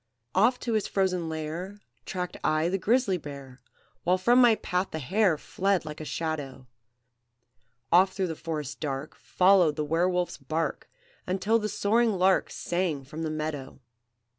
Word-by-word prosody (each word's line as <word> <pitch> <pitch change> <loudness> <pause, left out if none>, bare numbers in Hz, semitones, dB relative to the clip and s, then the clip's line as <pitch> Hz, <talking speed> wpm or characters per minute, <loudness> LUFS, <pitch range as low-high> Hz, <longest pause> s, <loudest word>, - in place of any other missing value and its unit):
"Oft 230 +6 +3
to 235 - -1
his 215 -2 +1
frozen 180 -4 0
lair 160 +6 -5 0.3
Tracked 180 -2 -4
I 155 +2 +2
the 195 +2 -1
grizzly 215 -3 +2
bear, 140 -3 -10 0.4
While 180 +1 +3
from 240 +7 +4
my 235 -3 +6
path 180 -2 -2
the - - -5
hare 180 +4 +2
Fled 195 +2 -1
like 155 0 -7
a - - -6
shadow; 145 -6 -4 1.3
Oft 185 +2 +5
through 190 - 0
the 160 - -3
forest 150 -4 -5
dark 140 -1 -4
Followed 180 -4 +3
the 150 0 -2
were 165 +4 +2
wolf's 180 -1 -1
bark, 155 +4 -3 0.4
Until 200 +5 +1
the 215 -1 -2
soaring 225 +3 +2
lark 190 0 +3
Sang 175 -5 -2
from 150 +4 -8
the 160 - -2
meadow. 155 -4 -4
175 Hz, 160 wpm, -27 LUFS, 155-195 Hz, 1.3 s, my